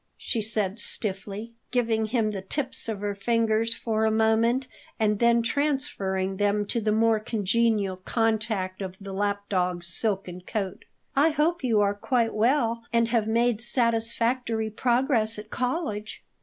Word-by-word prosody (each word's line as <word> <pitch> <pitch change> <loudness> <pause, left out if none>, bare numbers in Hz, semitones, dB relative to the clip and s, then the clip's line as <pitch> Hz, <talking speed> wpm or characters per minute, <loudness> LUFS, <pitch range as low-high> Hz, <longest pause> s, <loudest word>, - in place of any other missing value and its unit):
she 230 - -2
said 210 -1 0
stiffly, 205 +2 -3 0.2
giving 225 -3 +1
him 220 -2 +1
the 195 -2 -4
tips 260 +4 -3
of 210 -3 -3
her 205 0 -1
fingers 225 +2 +1
for 220 -1 -1
a 220 - +4
moment, 225 +4 +2 0.3
and 210 -2 +2
then 235 0 +4
transferring 225 -8 -1
them 205 0 +1
to 235 +3 -1
the 215 0 +1
more 225 0 +3
congenial 210 -2 +1
contact 215 -2 -1
of 190 -1 -5
the 195 -1 -7
lap 200 +1 -1
dog's 180 -2 0
silken 185 -1 -2
coat. 195 0 -4 0.3
"I 290 +4 +5
hope 320 +2 0
you 225 -5 +3
are 200 0 +2
quite 230 +2 0
well 230 0 +1
and 230 0 +2
have 225 -3 +1
made 230 0 +2
satisfactory 230 -1 +1
progress 235 -1 +1
at 210 +1 -9
college." 250 -6 -3
220 Hz, 150 wpm, -26 LUFS, 205-235 Hz, 0.3 s, I